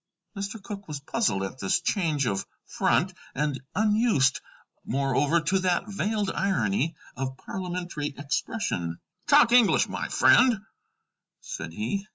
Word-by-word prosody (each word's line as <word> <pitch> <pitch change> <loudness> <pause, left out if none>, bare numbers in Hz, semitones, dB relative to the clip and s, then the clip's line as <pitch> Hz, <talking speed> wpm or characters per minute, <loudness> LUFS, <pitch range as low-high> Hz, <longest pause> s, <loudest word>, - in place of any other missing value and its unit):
Mr. 200 +2 -5
Cooke 200 0 -8
was 150 -2 -5
puzzled 140 - 0
at 95 +7 -6
this 95 - +1
change 155 - 0
of 100 -4 -2 0.2
front, - - +1 0.2
and 145 -2 -1
unused, 210 - +3 0.4
moreover, 140 +4 +1
to 185 +5 +1
that 185 +1 0
veiled 205 0 -1
irony 150 - 0 0.2
of 130 +1 -4
parliamentary 180 -5 -4
expression. 140 - -2 0.3
"Talk 230 - +6
English, 240 -4 +5
my - - -4
friend," 245 -6 +5 0.8
said 80 - -6
he. 155 - -3
170 Hz, 125 wpm, -26 LUFS, 130-200 Hz, 0.8 s, Talk